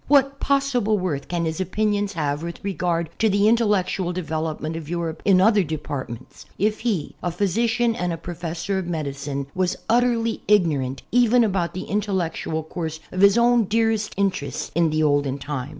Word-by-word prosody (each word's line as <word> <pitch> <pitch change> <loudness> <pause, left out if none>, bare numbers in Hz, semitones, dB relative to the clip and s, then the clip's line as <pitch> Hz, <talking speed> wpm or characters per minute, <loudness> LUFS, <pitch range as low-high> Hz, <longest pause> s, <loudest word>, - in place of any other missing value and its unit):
What 275 -1 +3
possible 265 -6 +1
worth 160 -7 -2
can 170 -1 -1
his 160 +3 -2
opinions 205 +2 0
have 145 -3 -1
with 170 0 -7
regard 175 -4 -1
to' 220 - +3
the 200 +1 +3
intellectual 205 -5 +2
development 160 -2 -3
of 160 -2 -7
Europe 170 -2 -3
in 195 -2 +5
other 210 +2 +5
departments, 145 -7 -6
if 210 +1 +1
he, 210 -10 -1
a 175 - -1
physician 225 +6 +1
and 180 -3 -1
a 165 - -3
professor 175 +3 -4
of 180 - -5
medicine, 140 -4 -3
was 185 -1 0
utterly 230 -1 +2
ignorant, 150 -10 +2
even 245 0 +4
about 190 -6 -1
the 185 - -3
intellectual 185 -6 -2
course 160 0 -5
of 185 - -2
his 200 +2 +6
own 235 -1 +4
dearest 225 +1 0
interests 195 -8 -1
in 170 0 +3
the 155 0 +1
olden 145 -2 +1
time 140 -2 -5
180 Hz, 165 wpm, -23 LUFS, 160-215 Hz, -, his